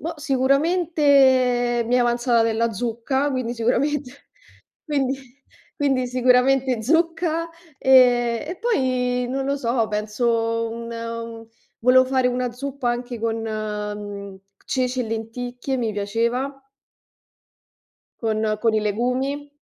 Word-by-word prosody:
Boh, 330 +2 -4
sicuramente 275 -4 +3
mi 245 - +1
è - - +4
avanzata 240 -1 +2
della 230 0 0
zucca, 245 +6 -1
quindi 255 -2 -2
sicuramente 255 +3 0 0.7
quindi 270 -3 -2 0.4
quindi 270 -4 +1
sicuramente 255 0 +2
zucca, 330 +3 +1 0.3
ehm, 245 0 +4
e 355 - -5
poi 255 - 0
non 270 +1 -2
lo 280 0 0
so, 235 -3 0
penso 230 +2 0
un 230 0 -7
u 230 0 -6 0.3
volevo 255 +2 +5
fare 260 -1 +1
una 250 0 -1
zuppa 260 0 -3
anche 240 -1 -4
con, 225 -1 -1
mhmm, 210 -2 -5 0.3
ceci 255 -1 -1
e 245 - -1
lenticchie. 245 +4 -4
Mi 230 -3 -1
piaceva. 230 +6 -1 1.7
Con 220 -1 0 0.2
con 225 -1 +2
i 215 - +2
legumi. 250 +7 -1
250 Hz, 115 wpm, -22 LUFS, 230-270 Hz, 1.7 s, volevo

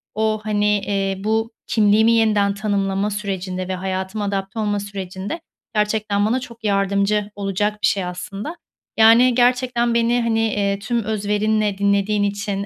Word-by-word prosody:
o, 215 0 0
hani, 210 -1 0
eee, 195 -1 -1
bu 225 +2 0 0.2
kimliğimi 220 +1 +4
yeniden 210 -3 +3
tanımlama 200 -1 -1
sürecinde 190 -3 -4
ve 185 - -2
hayatıma 190 +2 -3
adapte 195 +2 -3
olma 205 -1 0
sürecinde 200 - -6 0.3
gerçekten 210 -1 +1
bana 235 +4 +1
çok 235 -3 -11
yardımcı 200 0 +1
olacak 205 +1 -1
bir - - +4
şey 195 -2 0
aslında. 195 - -6 0.4
Yani, 230 +2 +6
gerçekten 245 -1 +2
beni, 235 +1 +2
hani, 230 -1 +1
eee, 200 -1 0
tüm 230 +2 -1
özverinle 210 0 0
dinlediğin 200 +1 +1
için, 200 0 -2
205 Hz, 140 wpm, -21 LUFS, 200-220 Hz, 0.4 s, Yani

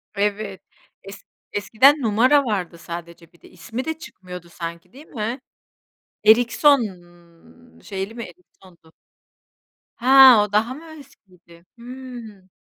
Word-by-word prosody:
Evet, 200 -1 -2 0.4
es 195 +1 -11 0.3
eskiden 260 +8 +3
numara 255 +6 +3
vardı 185 -7 -3
sadece 170 0 -10
bir 170 - -25
de. - - -17
İsmi 240 +3 -7
de 320 0 -4
çıkmıyordu 180 - -11
sanki, 170 +1 -8
değil 285 +4 -14
mi? 230 +2 -5 0.9
Erikson, 245 +6 +5 1.0
şeyli 195 +2 -6
mi 235 - -6
Erikson'du? 185 - -18 1.0
He, 240 - -11 0.3
o 210 -2 +1
daha 225 +4 +1
mı 300 +5 -12 0.2
eskiydi? 180 -10 -20
Hımm. 240 -6 -11
210 Hz, 115 wpm, -21 LUFS, 180-250 Hz, 1.0 s, Erikson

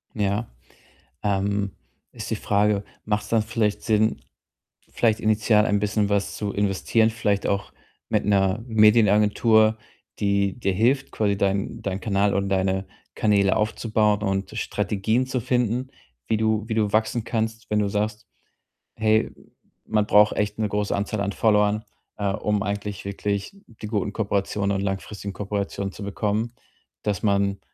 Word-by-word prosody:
Ja, 105 +1 0 0.8
ähm, 100 0 0 0.4
ist - - -7
die - - 0
Frage, 105 0 +1 0.2
macht's 105 -1 -1
dann 115 -1 +2
vielleicht 110 -2 -1
Sinn, 110 -1 +1 0.7
vielleicht 115 -2 +1
initial 110 -1 +3
ein 105 -1 +2
bisschen 105 0 0
was 100 -1 0
zu 105 -1 -3
investieren, 105 +3 +2
vielleicht 105 -3 -1
auch 100 -1 -1 0.4
mit - - +1
'ner 95 0 +2
Medienagentur, 110 0 +4 0.4
die 100 +1 +1
dir 100 -5 0
hilft, 130 +7 +1
quasi 100 -2 0
deinen 100 0 -1
deinen 95 -1 -3
Kanal 100 -2 +1
und 100 0 0
deine 95 0 0 0.3
Kanäle 100 -2 +3
aufzubauen 105 -1 +1
und 95 -1 -1
Strategien 105 +4 0
zu 130 -1 -1
finden, 125 +1 0 0.4
wie 110 - +1
du 110 -1 +1
wie 115 - -2
du 105 -2 +1
wachsen 110 +2 +1
kannst, 110 0 -3
wenn 105 - +2
du 105 - +1
sagst: 105 +3 -2 0.7
„Hey, 110 0 +2 0.5
man 105 -1 +1
braucht 105 0 +5
echt 105 0 -1
'ne 110 -1 0
große 105 0 -1
Anzahl 100 +1 -2
an 100 0 -1
Followern, 105 0 +2 0.3
äh, 100 -1 0
um 105 -1 -1
eigentlich 100 -1 -4
wirklich 100 - -3
die 110 -1 -9
guten 105 -2 -2
Kooperationen 100 -1 -1
und - - -2
langfristigen 100 +1 -4
Kooperationen 100 0 -3
zu 100 - -9
bekommen.“ 105 +3 -2 0.5
Dass 105 -3 -2
man, 100 -1 +1
105 Hz, 145 wpm, -24 LUFS, 100-110 Hz, 0.8 s, braucht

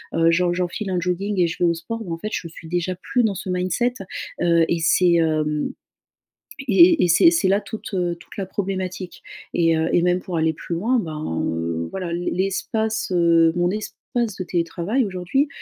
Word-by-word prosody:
heu, 165 0 +4
j'en 175 0 +2
j'enfile 180 +3 -2
un 180 - +1
jogging 185 +3 -1
et 175 - +4
je 165 - -5
vais - - +5
au - - +2
sport», 225 +8 -5
ben, 180 - -7
en - - -4
fait 215 - -4
je 170 - -3
suis 165 0 -12
déjà 175 +1 -1
plus 245 +7 0
dans 210 -3 +1
ce 185 - -6
mindset, 185 +7 0 0.5
heu, 170 -1 +4
et 170 - +2
c'est, 175 +2 +4
hem, 155 -2 +1 1.0
et 335 - +6
et - - +2
c'est 180 - +7
c'est 325 - +2
là 200 +2 +3
toute, 215 -1 -8
heu, 175 -2 0
toute - - -15
la 195 - -2
problématique. 190 -2 -4 0.3
Et 165 -1 +3
heu 160 +1 0
et 175 - +4
même 180 0 +2
pour 175 -2 -4
aller 160 0 +2
plus 165 - -6
loin, 230 +8 +1
ben, 155 - -3
heu, 85 0 -2
voilà, 185 -3 -4
l'e 175 +1 -2
l'espace, 220 +4 -1
heu 165 -1 +4
mon 175 0 +2
espace 215 +1 -3
de 185 - -1
télétravail 175 +8 -1
aujourd'hui, 195 - 0
180 Hz, 205 wpm, -22 LUFS, 165-200 Hz, 1.0 s, c'est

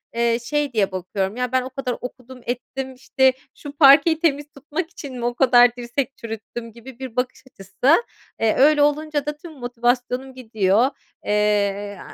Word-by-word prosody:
eee, 235 0 +1
şey 295 +1 -1
diye 205 -4 +1
bakıyorum, 190 +2 -3
"Ya 250 -1 -2
ben 260 0 +2
o 255 - -6
kadar 255 -2 -4
okudum 250 0 -9
ettim, 260 +2 -4
işte, 260 0 +2 0.2
şu 290 - -9
parkeyi 310 +3 +6
temiz 295 -4 +1
tutmak 300 +5 -5
için 285 -6 -9
mi 240 - -3
o 240 - 0
kadar 245 -2 +5
dirsek 245 +2 -3
çürüttüm?" 230 +1 -7
gibi 235 +2 -13
bir 260 -3 -7
bakış 250 +1 -2
açısı. 240 - +1 0.4
Eee, 225 -1 +2
öyle 295 +2 +5
olunca 295 0 +1
da 295 0 -4
tüm 330 +2 -11
motivasyonum 245 0 -2
gidiyor, 220 -1 +1 0.4
eee, 205 -1 0
250 Hz, 165 wpm, -22 LUFS, 230-275 Hz, 0.4 s, parkeyi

